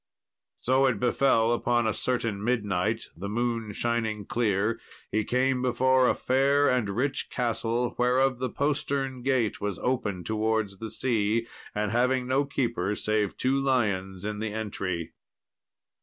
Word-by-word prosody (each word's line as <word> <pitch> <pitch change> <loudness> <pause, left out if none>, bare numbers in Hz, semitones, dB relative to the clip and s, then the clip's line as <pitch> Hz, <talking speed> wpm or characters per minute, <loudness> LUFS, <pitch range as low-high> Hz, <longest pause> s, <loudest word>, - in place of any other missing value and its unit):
So 130 +2 +3
it 120 -6 0
befell 120 -1 +3
upon 120 0 +1
a 110 - +1
certain 115 -3 -1
midnight, 110 -2 0
the 100 +4 -5
moon 115 -1 -1
shining 110 -2 -1
clear, 110 0 0 0.3
he 110 0 +1
came 130 +2 +1
before 130 +1 +3
a - - +2
fair 140 +2 +2
and 125 -5 +1
rich 130 +8 -1
castle, 120 0 -1
whereof 125 +1 +2
the 130 0 -1
postern 140 -2 -1
gate 125 -4 0
was 100 -2 -2
open 105 -8 -1
towards 110 -2 -1
the 110 - -5
sea, 115 -1 0 0.3
having 120 +5 +1
no 135 +3 +1
keeper 115 -8 -1
save 105 -2 -1
two 135 +2 +1
lions 100 -8 0
in 105 -1 -3
the 110 0 -2
entry. 95 -6 -3
115 Hz, 140 wpm, -27 LUFS, 105-130 Hz, 0.3 s, So